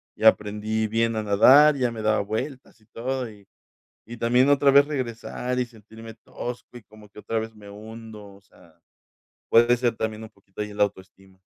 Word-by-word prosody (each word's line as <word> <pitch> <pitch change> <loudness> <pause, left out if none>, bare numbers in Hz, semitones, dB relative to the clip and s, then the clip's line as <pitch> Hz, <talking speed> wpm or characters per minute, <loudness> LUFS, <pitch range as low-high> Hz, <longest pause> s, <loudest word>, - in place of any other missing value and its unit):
y - - -9
aprendí 110 0 +2
bien 115 +1 0
a 110 - -2
nadar, 130 +9 +6
ya 125 -2 0
me 115 -1 -7
daba 110 -1 +2
vueltas 115 +5 -6
y - - -26
todo, 125 +2 -4
y 100 -1 -18 0.6
y 120 - -9
también 125 +4 +3
otra 140 0 +4
vez 140 +1 +6
regresar, 125 -2 -4
y - - +1
sentirme 110 0 -13
tosco, 120 +2 -9
y - - -18
como 105 0 -18
que 105 - -13
otra 115 +1 -3
vez 110 0 -6
me 105 -1 -14
hundo, 110 -1 -11
o - - -20
sea, 85 -4 -23 0.7
puede 120 +1 +5
ser 120 -1 0
también 110 0 -4
un 110 - -10
poquito 100 -1 -11
ahí 105 - -8
en 105 - -12
la - - +4
autoestima. 95 -1 -13
110 Hz, 200 wpm, -24 LUFS, 105-120 Hz, 0.7 s, nadar